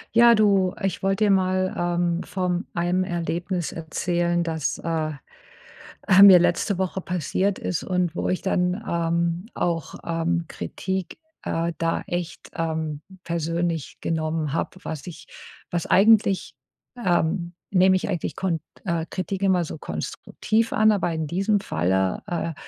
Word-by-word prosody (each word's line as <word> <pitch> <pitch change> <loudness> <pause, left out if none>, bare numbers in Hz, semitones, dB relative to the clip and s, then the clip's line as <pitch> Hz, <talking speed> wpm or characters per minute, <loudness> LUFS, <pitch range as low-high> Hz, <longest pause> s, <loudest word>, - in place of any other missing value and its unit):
Ja, 235 0 +8
du, 200 -3 +3
ich 195 -3 -1
wollte 195 +2 +1
dir 205 - +4
mal, 185 -1 +2
ähm, 175 0 0
vom 180 0 -2
einem 175 +2 +1
Erlebnis 175 0 -2
erzählen, 175 +1 -1
dass, 160 -3 -2
äh, 160 -2 -1 1.1
mir 195 -3 +11
letzte 180 +2 +1
Woche 190 0 -2
passiert 180 +3 -1
ist 175 - -3
und 180 -2 -1
wo - - -1
ich 185 - 0
dann, 180 +2 0
ähm, 170 +2 0
auch, 170 -2 -2
ähm, 170 0 -1
Kritik, 190 -1 -4 0.2
äh, 165 +1 -1
da 165 0 0
echt, 175 -1 -5
ähm, 160 -2 -2 0.2
persönlich 165 -1 -2
genommen 155 -2 -1
habe, - - -1
was 155 -3 -6
ich 175 - -9 0.4
was 170 -2 -1
eigentlich, 200 -1 +4 0.5
ähm, 175 0 +1 0.2
nehme 185 0 +5
ich 185 - -2
eigentlich 175 -4 -2
kont 170 -5 -1 0.2
äh, 170 -2 0
Kritik 190 +1 -3
immer 190 -2 +3
so 160 - -6
konstruktiv 215 - -2
an. 215 0 +5
Aber 190 -4 0
in 160 -1 -2
diesem 195 +6 +1
Falle, 95 - 0
äh, 165 -2 -3
175 Hz, 140 wpm, -24 LUFS, 165-190 Hz, 1.1 s, mir